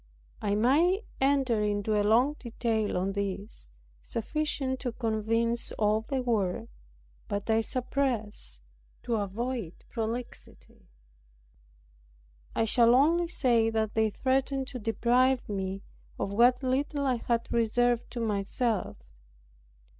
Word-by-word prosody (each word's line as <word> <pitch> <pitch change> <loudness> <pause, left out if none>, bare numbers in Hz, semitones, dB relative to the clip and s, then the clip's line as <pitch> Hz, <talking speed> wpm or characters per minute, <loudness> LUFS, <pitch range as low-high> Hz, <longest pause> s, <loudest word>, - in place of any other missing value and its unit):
I 205 -1 0
might 325 - +3
enter 265 -5 +2
into 210 +1 0
a 210 - +3
long 235 +7 +3
detail 225 -4 -1
on 190 +2 0
this, 200 - -5 0.3
sufficient 260 - -2
to 245 -3 -3
convince 230 +1 0
all 215 0 +1
the 260 +3 -3
world; 195 - -1 0.6
but 205 0 -3
I 220 0 +3
suppress, 230 - -2 0.4
to 235 -2 0
avoid 210 -1 -4
prolixity. 230 +1 -6 1.7
I 225 - +2
shall 235 +1 +4
only 335 +6 +3
say, 240 -9 +3
that 220 -1 -1
they 220 -1 +2
threatened 265 +3 0
to 255 - -6
deprive 245 +4 +2
me 195 -1 -4 0.3
of 200 - -3
what 245 +4 +4
little 280 +2 0
I 255 -2 +1
had 235 0 -1
reserved 235 +1 +1
to 240 - -4
myself. 215 0 -1
230 Hz, 115 wpm, -29 LUFS, 210-255 Hz, 1.7 s, shall